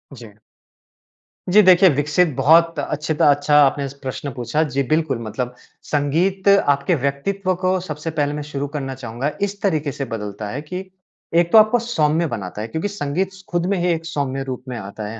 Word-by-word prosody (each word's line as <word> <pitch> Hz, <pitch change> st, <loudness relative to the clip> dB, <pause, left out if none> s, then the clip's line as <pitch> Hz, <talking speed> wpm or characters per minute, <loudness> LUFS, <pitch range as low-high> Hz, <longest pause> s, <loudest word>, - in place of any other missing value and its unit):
जी। 115 Hz, -4 st, -12 dB, 1.2 s
जी 210 Hz, +3 st, +7 dB
देखिए, 185 Hz, 0 st, +7 dB
विकसित 150 Hz, +4 st, +2 dB
बहुत 165 Hz, +5 st, +4 dB
अच्छी 150 Hz, +1 st, -2 dB
त -, -, +1 dB
अच्छा 145 Hz, +1 st, +4 dB
आपने 140 Hz, 0 st, 0 dB
स 135 Hz, -, -11 dB
प्रश्न 135 Hz, +2 st, -4 dB
पूछा। 125 Hz, +6 st, -1 dB
जी 140 Hz, -, +2 dB
बिल्कुल, 155 Hz, -1 st, 0 dB
मतलब 125 Hz, +3 st, -4 dB, 0.4 s
संगीत 170 Hz, +7 st, 0 dB
आपके 145 Hz, -4 st, +3 dB
व्यक्तित्व 185 Hz, +8 st, -1 dB
को 185 Hz, 0 st, +1 dB
सबसे 155 Hz, -2 st, -5 dB
पहले 145 Hz, 0 st, +1 dB
मैं 150 Hz, -, -4 dB
शुरू 145 Hz, -1 st, -4 dB
करना 135 Hz, -2 st, -4 dB
चाहूँगा 130 Hz, +3 st, -4 dB
इस 200 Hz, 0 st, -2 dB
तरीके 155 Hz, -7 st, 0 dB
से 135 Hz, -, -4 dB
बदलता 105 Hz, -2 st, -6 dB
है 140 Hz, +6 st, -4 dB
कि 180 Hz, +5 st, -6 dB, 0.5 s
एक 170 Hz, 0 st, +3 dB
तो -, -, +7 dB
आपको 215 Hz, +3 st, +6 dB
सौम्य 170 Hz, -8 st, +1 dB
बनाता 105 Hz, -5 st, -5 dB
है। 110 Hz, -, -4 dB
क्योंकि 160 Hz, -, -3 dB
संगीत 190 Hz, -1 st, -2 dB
स 190 Hz, 0 st, -15 dB
खुद 175 Hz, -1 st, -1 dB
में -, -, 0 dB
ही 175 Hz, -, 0 dB
एक 165 Hz, 0 st, -2 dB
सौम्य 135 Hz, -4 st, -3 dB
रूप 130 Hz, -1 st, -6 dB
में 125 Hz, -, -5 dB
आता 105 Hz, 0 st, -7 dB
है, 110 Hz, +2 st, -7 dB
150 Hz, 195 wpm, -20 LUFS, 135-180 Hz, 1.2 s, जी